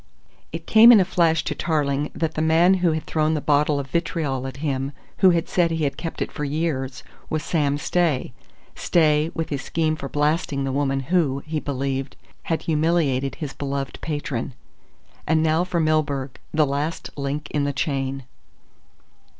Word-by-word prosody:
It - - -6
came 225 +2 +8
in 225 - +8
a 185 - +3
flash 165 -3 +2
to - - -2
Tarling 145 -2 0
that 160 -1 -1
the 155 - -2
man 165 +4 +4
who 170 -3 +3
had 155 - -3
thrown 155 0 +1
the - - 0
bottle 145 0 +2
of 140 - -3
vitriol 150 -6 -1
at 135 - -8
him, 135 0 -2 0.2
who 190 - +6
had 170 -2 +1
said 175 -2 +2
he 160 -1 -1
had 140 -1 0
kept 165 +2 -4
it - - -8
for 150 - -5
years 140 -3 -2 0.3
was 155 0 -2
Sam 145 -4 0
Stay. 150 -6 0 0.4
Stay, 155 -2 +2
with 165 - -3
his 140 -3 -2
scheme 155 +1 0
for 140 -3 -6
blasting 145 -1 0
the 135 - -1
woman 135 0 0
who, 140 -6 +2
he 155 0 -2
believed, 135 -1 -3 0.3
had 165 - -1
humiliated 150 -4 +1
his 150 -4 -6
beloved 140 -1 -4
patron. 145 -5 -3 0.7
And 160 0 +3
now 160 +2 +2
for 180 -1 -1
Milburgh, 145 -4 0
the 155 -1 +3
last 145 +4 -3
link 145 +2 -3
in 145 -1 0
the 145 - 0
chain. 135 -1 -2
150 Hz, 175 wpm, -23 LUFS, 140-160 Hz, 0.7 s, came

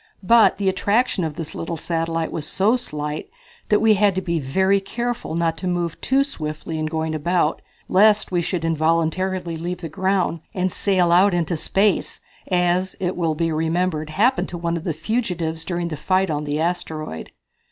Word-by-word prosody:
But 230 +4 +5
the 200 - -1
attraction 200 +2 +1
of 155 -2 -3
this 160 -1 -6
little 165 0 -4
satellite 165 0 -2
was 155 -2 -4
so 205 +8 +2
slight 150 - -4 0.4
that 210 - +4
we 220 -1 +5
had 205 -1 +3
to 190 - 0
be 170 -1 -1
very 190 +8 +2
careful 235 -2 -3
not 165 -1 0
to 185 - -3
move 175 -2 -2
too 270 +1 +3
swiftly 155 - -5
in 155 - -1
going 160 0 -2
about 160 +1 0 0.3
lest 210 +2 +4
we 175 -1 +1
should 170 -1 -2
involuntarily 165 +2 0
leave 175 +2 -4
the 165 - -5
ground 185 +1 0 0.2
and 185 0 0
sail 185 -4 +2
out 185 +2 +5
into 170 -1 0
space, 195 +5 +1 0.3
as, 180 +1 +1
it 185 -1 -1
will 165 -3 0
be 165 +1 0
remembered, 160 0 0
happened 225 +11 +2
to 170 -1 -2
the 165 -1 -2
fugitives 170 -4 -2
during 175 -1 -2
the 155 - -5
fight 185 +3 +1
on 150 0 -2
the 145 +1 -2
asteroid. 160 - -3
175 Hz, 175 wpm, -22 LUFS, 160-190 Hz, 0.4 s, But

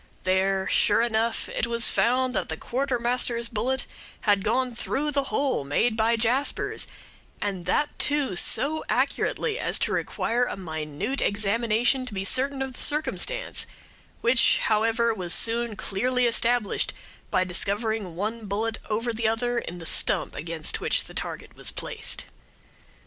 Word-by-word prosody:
There, 190 +1 +1
sure 210 +2 +3
enough, 230 0 0
it - - -1
was 235 0 +1
found 255 +1 +2
that - - -2
the - - -3
Quartermaster's 245 -2 0
bullet 245 +4 -1 0.4
had 205 -3 +2
gone 245 +3 0
through 285 +5 -1
the 280 -1 +1
hole 275 - 0
made 145 - +1
by 225 +1 +2
Jasper's, 240 +5 0 0.5
and 190 -4 -3
that, 290 +10 0
too, 290 -9 +2
so 305 - +3
accurately 450 +1 0
as - - +1
to - - -1
require 240 +2 0
a - - -5
minute 160 - -3
examination 230 +5 +1
to 215 - -7
be 190 0 -2
certain 270 +5 +2
of 265 -1 -6
the - - -7
circumstance, - - 0 0.5
which, 235 +1 +4
however, 225 +2 +2
was 180 -5 0
soon 230 -1 +1
clearly 245 +5 0
established 235 -1 +1 0.3
by 185 - +2
discovering 200 +1 0
one 215 +4 -3
bullet 220 +3 -2
over 230 +2 -1
the 225 0 0
other 240 +2 0
in 180 - -7
the 170 - -9
stump - - +1
against 160 +1 -3
which - - +2
the - - -11
target - - -5
was - - -2
placed." - - -3
230 Hz, 150 wpm, -26 LUFS, 205-250 Hz, 0.5 s, which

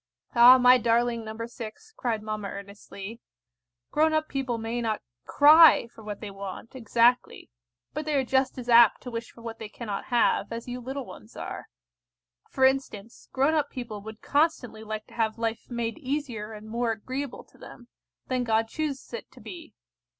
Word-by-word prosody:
"Ah, 245 +1 +9
my 250 0 +6
darling 235 0 +1
No. 220 +1 -6
6," 235 - -10
cried 225 -4 -2
mamma 215 -1 -4
earnestly, 200 +2 -9 0.7
"grown 315 +1 +3
up 310 0 +1
people 260 -4 -2
may 230 +2 -3
not 220 -2 -2 0.2
cry 310 -1 +7
for 220 - -14
what 210 -1 -7
they 210 -2 -6
want 195 +3 -8
exactly, 240 - +1 0.4
but 305 +1 -4
they 305 -1 -1
are 275 - +2
just 265 +1 0
as 245 -1 -7
apt 235 -2 +6
to 250 - -7
wish 230 0 -5
for 230 - -16
what 230 -1 -7
they 220 - -7
cannot 210 -3 -5
have, 240 -2 +1
as 230 +1 -6
you 245 0 -5
little 265 +2 -5
ones 220 - -13
are. - - -6 0.8
For 265 - +2
instance, 250 -5 -2
grown 275 +4 +2
up 295 -2 +1
people 235 -5 -7
would 220 +1 -10
constantly 285 -7 0
like 215 0 -5
to - - -19
have 225 -1 -1
life 225 0 -3
made 235 +3 -3
easier 255 -7 -4
and 215 0 -10
more 235 +1 -1
agreeable 255 +5 -5
to - - -25
them, 240 - -13 0.4
than 255 -1 0
God 225 -1 +1
chooses 300 - -4
it 475 - -7
to - - -15
be. 335 -3 -11
235 Hz, 180 wpm, -27 LUFS, 220-265 Hz, 0.8 s, Ah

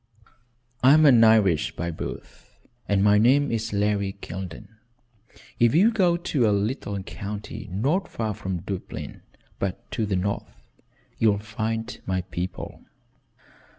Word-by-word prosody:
"I 130 +2 +7
am 155 0 +5
an 120 -5 +7
Irishman 105 -8 +4
by 85 - -2
birth, 80 - -9 0.3
and 100 -1 +3
my 105 0 +5
name 135 +5 +4
is 115 -1 -2
Larry 100 -1 0
Kildene. 90 -1 -7 0.9
If 120 +3 +4
you'll 205 +8 +5
go 180 -6 +2
to 140 -9 +1
a - - +2
little 100 -1 -2
county 105 +2 -7
not 140 - 0
so - - -25
far 110 -2 -2
from 95 -4 -4
Dublin, 95 0 -6 0.4
but 95 -1 -4
to 110 -3 -1
the 100 - 0
north, 100 +3 -3 0.6
you'll 105 -2 +4
find 110 +2 -4
my 95 -1 0
people." 90 0 -6
105 Hz, 140 wpm, -25 LUFS, 100-120 Hz, 0.9 s, I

